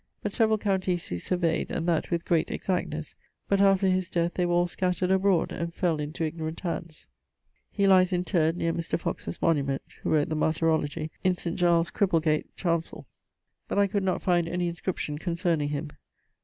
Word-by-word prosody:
But 205 - -2
severall 220 -2 +3
counties 190 -4 -1
he 90 - -2
surveyd, 170 - 0
and 165 - -2
that 165 -2 +1
with 170 -1 -1
great 165 -2 +2
exactnes, 160 -4 -3 0.3
but 200 0 +2
after 195 -1 +4
his 185 -1 +1
death 170 -1 0
they 180 -1 0
were 175 - +1
all 175 0 +4
scattered 180 +1 -1
abroad, 190 -2 +2
and 170 0 -3
fell 170 -3 0
into 150 +2 -3
ignorant 160 0 -4
hands. 170 -3 -5 0.7
He 200 - +1
lies 185 -1 +5
interred 175 -2 +1
neer 165 -1 0
Mr. 170 0 -2
Foxe's 170 - -4
monument 140 -4 +1 0.2
(who - - -2
wrote 150 -1 +2
the 155 - -1
Martyrologie) 155 0 0
in 185 -1 +3
St. 170 -1 -4
Giles' 170 -1 +2
Cripplegate 165 -6 +1
Chancell, 170 -2 -2 0.6
but - - -3
I 200 - +5
could 200 +1 -1
not 190 -1 -1
find 175 -2 +2
any 175 +1 -1
inscription 170 -3 -4
concerning 170 -4 0
him. 145 +1 -4
170 Hz, 180 wpm, -27 LUFS, 160-185 Hz, 0.7 s, lies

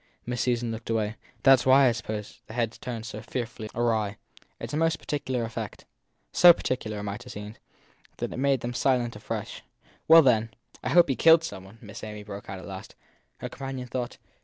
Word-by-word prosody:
Miss 120 -1 -2
Susan 120 -2 0
looked 115 0 -7
away. 110 -1 0 0.3
That 135 -1 +7
s - - -5
why, 135 +1 +7
I - - +5
suppose, 110 -3 -6
the 110 - -9
head 115 -2 0
turns 120 -2 -5
so 105 -1 -7
fearfully 115 -2 -5
awry. 110 -3 0 0.4
It - - -6
s - - -10
a - - 0
most 165 0 +2
peculiar 130 -4 -2
effect. 115 0 -6 0.5
So 175 -1 +9
peculiar, 115 -9 -3
it 105 - -5
might 105 +2 -5
have 125 -1 -10
seemed, 105 +1 -8 0.6
that - - -3
it - - -6
made 135 -1 +2
them 120 +1 -3
silent 120 -2 +1
afresh. - - -5 0.5
Well, 165 0 +9
then, 115 -4 +2 0.3
I - - -1
hope 175 0 +6
he 135 - 0
killed 165 +3 +6
some 95 -12 -6
one! 100 +4 -15
Miss 105 0 -10
Amy 105 -1 -7
broke 100 -1 -9
out 95 - -5
at 95 - -10
last. 95 -1 -9 0.4
Her - - -6
companion 135 -2 -6
thought. 125 0 -4
120 Hz, 210 wpm, -27 LUFS, 110-130 Hz, 0.6 s, So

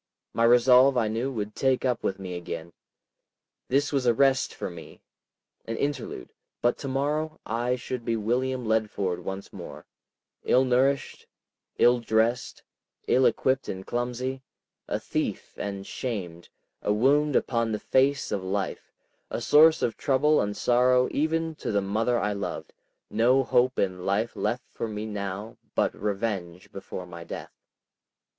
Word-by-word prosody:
My 115 - +2
resolve 125 +2 +6
I 115 -3 +2
knew 115 +5 -1
would 105 -4 -4
take 135 -1 +1
up 125 -2 0
with 95 - -1
me 95 -2 -6
again. 85 -1 -6 0.9
This 140 +3 +1
was 135 -3 +1
a 120 - +4
rest 135 +1 +3
for - - -5
me, 85 -2 -11 0.6
an 115 0 -4
interlude, 145 0 -3 0.3
but 120 - +2
to 140 - -5
morrow 150 +4 -1
I 120 +3 0
should 125 0 -5
be 115 0 0
William 125 +3 -1
Leadford 105 -5 0
once 95 +2 -6
more, - - -9 0.6
ill 130 - +4
nourished, 130 +2 +1 0.5
ill 120 0 +5
dressed, 115 +1 0 0.4
ill 130 +1 +5
equipped 130 0 0
and 95 0 -5
clumsy, 125 +2 -3 0.5
a - - -1
thief - - -3
and 100 -1 -5
shamed, 90 -10 -5 0.3
a - - 0
wound 140 +6 +3
upon 115 -2 +1
the 105 - -1
face 135 +1 +2
of 100 -3 -1
life, 95 +1 -3 0.4
a - - -3
source 155 +2 +5
of 115 - 0
trouble 150 +2 +3
and 105 0 -2
sorrow 125 +1 +3
even 160 +2 0
to - - -3
the 100 - +2
mother 110 +5 0
I 105 0 0
loved; 100 -1 -5 0.4
no 125 +4 +4
hope 125 0 +2
in 95 -2 -1
life 100 +5 0
left 120 +5 -2
for - - -4
me 105 0 -5
now 105 0 -5 0.2
but - - +2
revenge 100 -4 -3
before 95 -1 -7
my 85 -1 -9
death. 85 - -8
120 Hz, 150 wpm, -27 LUFS, 100-130 Hz, 0.9 s, resolve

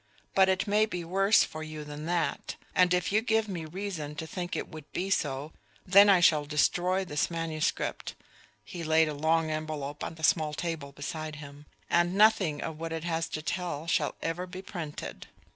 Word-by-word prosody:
But 190 0 +5
it 190 0 +1
may 210 +1 +3
be 180 -5 -4
worse 195 +4 +4
for 155 - -6
you 155 -1 -6
than 150 +1 -7
that; 170 -2 -1 0.2
and 180 -1 +4
if 180 0 +1
you 215 +2 +3
give 225 -1 +1
me 175 -5 -4
reason 160 -3 -5
to 160 - -5
think 175 +2 -4
it - - -3
would 155 -3 -11
be 190 +2 -2
so, 145 -3 -1 0.3
then 200 +2 +7
I 190 -3 +6
shall 155 -3 +5
destroy 180 +6 +1
this 150 -4 0
manuscript" 165 -2 -2 0.5
he 170 +10 -7
laid 160 0 +3
a - - -3
long 160 +2 +1
envelop 155 -2 -4
on 165 - -5
the 160 - -12
small 155 -1 +2
table 160 -5 -4
beside 155 +2 -5
him 145 0 -11 0.2
"and 175 +2 +2
nothing 195 -8 +4
of 160 -1 -5
what 165 0 -4
it 160 0 -4
has 165 -1 -1
to 155 - -5
tell 170 -3 -3
shall 165 - 0
ever 175 +3 -2
be 185 +1 -8
printed. 165 -7 -7
165 Hz, 195 wpm, -29 LUFS, 155-180 Hz, 0.5 s, then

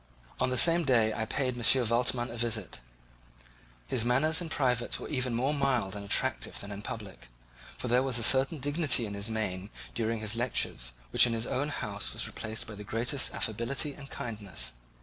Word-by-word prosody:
On 130 - +1
the 130 - -1
same 170 +3 +7
day 115 -6 +3
I 110 - -2
paid 130 0 -1
M. 120 +1 +4
Waldman 120 +1 +1
a - - -7
visit. 110 - -2 1.1
His 120 -4 0
manners 145 +8 +2
in 170 - -5
private 125 -6 0
were - - -7
even 125 -4 -1
more 130 +5 0
mild 135 -9 0
and 100 - -5
attractive 100 - 0
than 100 - -7
in 100 0 -6
public, 105 - -8 0.5
for - - -5
there 125 +1 +3
was 130 -2 +1
a 115 - 0
certain 135 +6 +5
dignity 145 -3 +1
in 100 - -6
his 100 +2 -2
mien 105 -3 -3 0.2
during 115 0 -1
his 110 0 +1
lecture 120 +2 0 0.4
which - - +7
in 120 - -1
his 115 0 0
own 145 +3 -1
house 105 -7 -3
was - - -1
replaced 110 0 -4
by 110 - -9
the 105 0 -8
greatest 120 +6 +1
affability 120 +7 -2
and 140 0 -11
kindness. 100 - -4
120 Hz, 190 wpm, -29 LUFS, 110-130 Hz, 1.1 s, same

